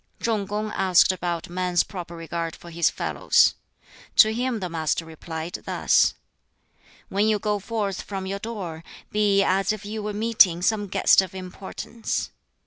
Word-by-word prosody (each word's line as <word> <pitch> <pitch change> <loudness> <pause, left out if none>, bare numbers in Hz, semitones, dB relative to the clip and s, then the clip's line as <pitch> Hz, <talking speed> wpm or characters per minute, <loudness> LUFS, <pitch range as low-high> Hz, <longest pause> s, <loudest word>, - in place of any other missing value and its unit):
Chung 215 -4 -1
kung 210 +1 -3
asked 185 -1 +4
about 175 -2 -3
man's 180 0 +1
proper 175 -3 -8
regard 165 0 -4
for 170 - -13
his 170 0 +2
fellows. - - +2 0.6
To 220 0 +7
him 245 0 -1
the 185 - -3
Master 165 -1 -1
replied 160 +1 -6
thus: - - +3 0.9
"When 200 +2 +1
you 215 -1 +3
go 210 0 -1
forth 205 -2 -3
from 195 -2 -5
your 195 +1 -3
door, 190 -7 -6 0.3
be 205 -2 +3
as 195 0 +2
if 215 -1 -5
you 215 +1 -4
were 210 0 -3
meeting 205 -5 +4
some 205 0 +1
guest 195 - +5
of 190 0 -7
importance. 190 +4 -5
195 Hz, 155 wpm, -24 LUFS, 175-210 Hz, 0.9 s, To